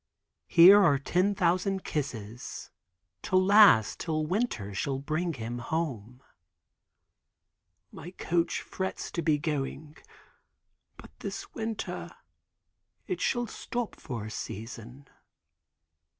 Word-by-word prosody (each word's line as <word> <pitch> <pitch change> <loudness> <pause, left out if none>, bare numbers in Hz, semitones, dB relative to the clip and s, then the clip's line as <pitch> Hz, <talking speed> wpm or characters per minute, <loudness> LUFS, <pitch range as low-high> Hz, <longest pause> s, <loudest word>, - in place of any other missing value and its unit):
Here 185 +4 +9
are 145 -6 +4
ten 180 +8 +1
thousand 185 +1 +1
kisses 120 -6 -5 0.5
to - - -2
last 185 - +6
till 155 -2 -1
winter 165 - -2
shall 135 +7 -2
bring 155 +5 -2
him 120 -2 -5
home." 125 -4 -4 1.7
"My 175 - -9
coach 170 -2 -1
frets 190 0 -5
to 170 - -2
be 155 -3 +2
going. 150 0 -4 1.0
But - - -13
this 200 +2 -6
winter 225 -1 -4 1.0
it 370 - -4
shall 240 -1 +1
stop 240 0 -5
for 120 -7 -6
a 110 - -7
season." 120 +6 -8
155 Hz, 105 wpm, -29 LUFS, 125-190 Hz, 1.7 s, Here